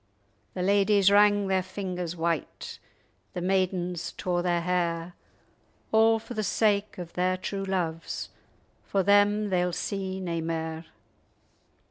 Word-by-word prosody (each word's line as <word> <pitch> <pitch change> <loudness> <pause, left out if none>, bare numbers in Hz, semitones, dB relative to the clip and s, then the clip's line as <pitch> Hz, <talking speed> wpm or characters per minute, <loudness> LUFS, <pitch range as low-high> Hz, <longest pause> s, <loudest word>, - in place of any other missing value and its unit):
The 180 - -2
ladyes 200 0 +4
wrang 205 0 +5
their 190 -1 +1
fingers 180 -2 -4
white; 165 -2 -3 0.5
The 180 - -4
maidens 180 -2 -1
tore 175 -1 -1
their 175 -1 +1
hair, 170 -1 -1 0.8
A' 225 +1 +5
for 225 +2 -8
the 215 - -2
sake 210 +1 +1
of 175 -2 -7
their 185 +1 +1
true 195 +1 -4
loves; 170 -4 -3 0.5
For 195 -1 0
them 205 +1 +4
they'll 180 -1 +2
see 190 0 -3
nae 170 -3 -2
mair. 160 0 -3
185 Hz, 125 wpm, -27 LUFS, 175-200 Hz, 0.8 s, wrang